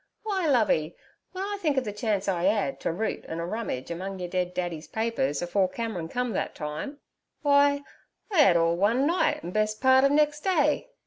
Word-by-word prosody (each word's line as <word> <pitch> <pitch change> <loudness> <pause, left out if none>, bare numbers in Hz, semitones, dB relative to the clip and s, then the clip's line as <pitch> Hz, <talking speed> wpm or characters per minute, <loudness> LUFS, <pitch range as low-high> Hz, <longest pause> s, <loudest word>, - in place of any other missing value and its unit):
W'y, 385 -5 0
Lovey, 180 - +2 0.4
w'en 380 +2 -3
I 405 - -5
think 300 -5 +1
ov 265 - +2
the 210 -4 -5
chance 205 -2 -1
I 180 -2 0
'ad 210 +5 0
t' - - -2
root 200 +7 -2
an' 160 - -5
a 170 - -2
rummage 180 - -4
among 190 +3 -5
yer 180 -1 -4
dead 180 0 -2
daddy's 175 -3 -3
papers 220 -11 -1
afore 185 +2 +1
Cameron 215 -7 -4
come 250 +1 -2
thet - - -2
time—w'y, 280 - -5 0.8
I 355 -6 +5
'ad 180 -11 +6
all 165 0 +2
one 225 +9 +2
night, 345 +4 +1
an' 175 - -5
best 215 +1 0
part 260 0 +5
ov 275 - +5
nex' 295 +1 +2
day. 310 - +1
215 Hz, 195 wpm, -27 LUFS, 175-275 Hz, 0.8 s, ad